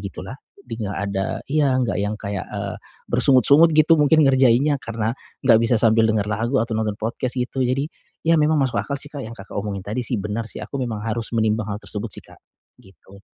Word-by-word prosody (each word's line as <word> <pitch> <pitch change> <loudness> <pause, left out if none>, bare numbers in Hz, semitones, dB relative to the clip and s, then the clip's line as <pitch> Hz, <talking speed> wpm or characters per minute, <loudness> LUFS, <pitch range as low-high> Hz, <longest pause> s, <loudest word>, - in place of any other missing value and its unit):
gitu 100 -1 -7
lah. 130 +4 -9 0.2
Lebih 115 - -7
enggak 100 - -4
ada 95 -1 -1 0.2
iya 140 -2 +1
enggak 115 -8 0
yang 105 +1 -2
kayak, 100 -2 -5
eee, - - -5 0.3
bersungut-sungut 140 +5 +5
gitu 155 0 +5
mungkin 150 +1 +5
ngerjainnya, 135 +1 +3
karena 115 -1 -2 0.3
enggak 115 -3 +6
bisa 115 +1 +2
sambil 110 0 +3
dengar 105 -2 +1
lagu 110 +5 -1
atau 115 -1 0
nonton 110 -2 -1
podcast, 120 +3 -3
gitu. 125 +1 -2
Jadi, 130 +3 +1 0.4
ya 165 0 +3
memang 155 +1 +3
masuk 120 -6 0
akal 140 +8 -4
sih 145 +1 -6
Kak, 145 - -6
yang 115 - -8
Kakak 100 +1 -10
omongin 100 -2 -4
tadi 105 +4 -4
sih 125 - -2
benar 105 +3 -3
sih. - - -8
Aku 140 - -6
memang 110 -4 -3
harus 115 0 -2
menimbang 110 -1 +1
hal 105 - -8
tersebut 105 +2 -5
sih - - -9
Kak, - - -16 0.4
gitu. 95 +1 -18
115 Hz, 210 wpm, -22 LUFS, 105-135 Hz, 0.4 s, enggak